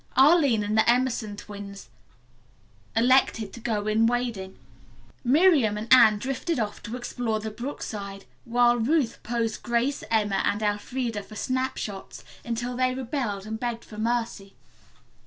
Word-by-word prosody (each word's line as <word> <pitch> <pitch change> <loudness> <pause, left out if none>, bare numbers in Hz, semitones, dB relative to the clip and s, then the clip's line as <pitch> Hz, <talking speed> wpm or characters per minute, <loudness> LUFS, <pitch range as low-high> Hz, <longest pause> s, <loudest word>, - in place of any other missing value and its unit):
Arline 275 -6 +5
and 210 +1 -1
the 220 +1 +4
Emerson 240 -4 +1
twins 200 - -9 1.1
elected 225 -3 +3
to - - -9
go 220 -3 -2
in 220 +1 +3
wading. 230 -6 -2 0.7
Miriam 270 - +4
and 220 +4 +2
Anne 220 -4 +7
drifted 270 +6 -2
off 210 -2 -3
to 235 +2 -6
explore 240 -3 -2
the 220 0 -5
brookside, 210 -5 -6 0.2
while 240 0 +3
Ruth 250 +1 +1
posed 230 -2 -2
Grace, 240 +4 0
Emma 210 -3 +1
and 205 +1 0
Elfreda 210 +2 -2
for 215 - -13
snapshots 255 -5 -3 0.2
until 240 +1 -3
they 255 0 +1
rebelled 240 -6 -3
and 220 +1 -5
begged 240 -1 -3
for 215 - -10
mercy. 225 -4 -2
230 Hz, 140 wpm, -26 LUFS, 210-250 Hz, 1.1 s, Anne